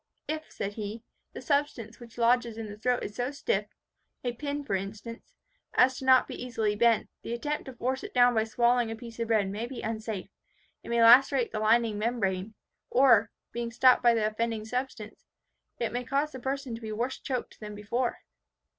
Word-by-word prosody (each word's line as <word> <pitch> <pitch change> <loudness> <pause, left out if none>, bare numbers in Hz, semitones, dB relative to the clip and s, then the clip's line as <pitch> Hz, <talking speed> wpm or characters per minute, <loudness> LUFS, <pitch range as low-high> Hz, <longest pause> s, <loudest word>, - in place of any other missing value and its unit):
"If," 310 0 -4
said 200 +1 -4
he, 215 +1 -6 0.3
"the - - -8
substance 280 -7 -1
which 235 -1 -13
lodges 235 -1 +2
in 225 -1 -5
the 205 - -7
throat 245 +3 0
is 205 - -6
so 245 +2 -1
stiff 290 - -1 0.6
(a 245 - 0
pin 285 +3 -4
for 275 - -4
instance) 220 - -6 0.4
as 255 +1 +4
not 260 -1 +6
to - - -8
be - - -6
easily 225 -4 -1
bent, 230 0 +3
the 235 - -4
attempt 295 +5 -3
to 265 - -8
force 255 +2 -2
it - - -7
down 245 -1 +5
by 220 -1 +2
swallowing 240 +1 +2
a 225 - -4
piece 230 0 -11
of 230 - -1
bread 215 -3 +2
may 215 +4 -4
be 255 -1 -7
unsafe; 220 -3 -4 0.5
it - - -11
may 235 0 +3
lacerate 250 +1 +6
the 215 - -3
lining 220 -1 +2
membrane, 210 -3 -1 0.3
or, 235 -5 +5 0.2
being 235 0 -3
stopped 255 +2 +5
by 240 -1 +5
the 220 -2 +1
offending 215 0 -2
substance, 245 -2 -5 0.5
it 235 - -2
may 245 +1 -2
cause 280 +4 0
the 260 - -8
person 265 0 -3
to 230 - -7
be 220 -1 -5
worse 240 +5 -2
choked 255 -3 -4
than 210 -1 -7
before." 235 +4 -2
235 Hz, 200 wpm, -28 LUFS, 220-255 Hz, 0.6 s, not